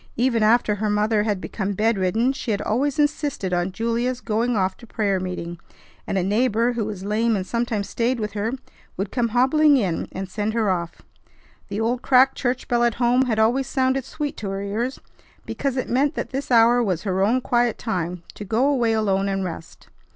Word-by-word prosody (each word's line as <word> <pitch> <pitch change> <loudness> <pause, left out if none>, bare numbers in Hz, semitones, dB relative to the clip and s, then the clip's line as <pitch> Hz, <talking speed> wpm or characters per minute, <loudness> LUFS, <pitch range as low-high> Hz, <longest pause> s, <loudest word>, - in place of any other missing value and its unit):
Even 235 -1 +1
after 215 0 +4
her 210 +1 -2
mother 210 +1 +2
had 210 -2 -1
become 200 +1 -3
bedridden 220 +3 +1
she 265 - -6
had 205 -2 0
always 270 +6 0
insisted 290 -10 0
on 175 +1 0
Julia's 235 +4 -1
going 235 +1 0
off 190 -1 0
to 235 - -14
prayer 205 -4 0
meeting, 175 -2 -5 0.5
and 195 - -1
a 185 - +1
neighbor 230 +4 +1
who 230 -3 -2
was 200 -3 -6
lame 220 +2 +1
and 190 -2 -2
sometimes 225 -1 -2
stayed 240 +1 0
with 210 -1 -3
her 210 +2 -2 0.5
would 195 +1 -3
come 245 -2 +1
hobbling 275 +5 +4
in 185 -9 -1
and 190 0 -5
send 210 +3 -2
her 220 -4 +2
off. 170 -2 -4 0.6
The 205 - -4
old 240 +3 0
cracked 265 +1 +4
church 250 -1 -2
bell 240 -1 +2
at 235 -2 +2
home 245 +2 +3
had 225 -4 -1
always 240 +5 +2
sounded 265 0 +1
sweet 290 +3 -4
to 205 - -4
her 195 +1 -3
ears 230 +6 -3 0.5
because 275 -2 -2
it 255 - -1
meant 280 +4 +1
that - - -4
this 270 +2 -4
hour 240 0 +5
was 185 -6 -1
her 190 -2 0
own 230 +6 +3
quiet 240 -2 +1
time 180 -5 -3
to - - -8
go 225 +6 +1
away 245 -6 +2
alone 200 -3 +1
and 195 0 -1
rest. 165 -2 -8
225 Hz, 200 wpm, -23 LUFS, 200-245 Hz, 0.6 s, hour